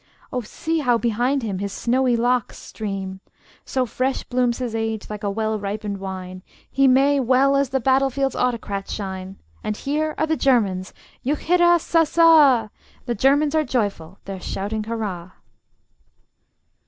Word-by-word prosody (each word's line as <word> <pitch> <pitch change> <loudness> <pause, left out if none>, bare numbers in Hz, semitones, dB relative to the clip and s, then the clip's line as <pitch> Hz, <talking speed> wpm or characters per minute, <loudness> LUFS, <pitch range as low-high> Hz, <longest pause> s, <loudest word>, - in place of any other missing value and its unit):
Oh, 250 - -1
see 320 +8 -3
how 245 -5 +2
behind 240 +4 0
him 200 -4 -3
his 200 0 -3
snowy 245 +3 +1
locks 245 0 0
stream! 195 -3 -6 0.5
So 260 -1 0
fresh 255 +3 -2
blooms 245 -1 0
his 245 -3 -4
age, 225 -1 -3
like 210 0 -6
a 205 - 0
well 220 +1 -1
ripened 205 0 -4
wine, 185 -1 -7 0.3
He 275 0 +2
may 275 +2 +4
well 265 +2 +3
as 275 -1 +1
the 265 0 0
battle 270 +2 +3
field's 270 0 -1
autocrat 215 -5 -2
shine. 190 -2 -5 0.3
And 210 0 -3
here 305 +2 -2
are 315 - +1
the 315 0 0
Germans: 205 -10 +1 0.3
juchheirassassa! 325 - +4 0.3
The 240 - -1
Germans 285 +6 +2
are 315 -1 +3
joyful: 200 - -2
they're 195 -2 -6
shouting 210 +4 -3
hurrah! 200 -6 -5
240 Hz, 145 wpm, -22 LUFS, 205-275 Hz, 0.5 s, may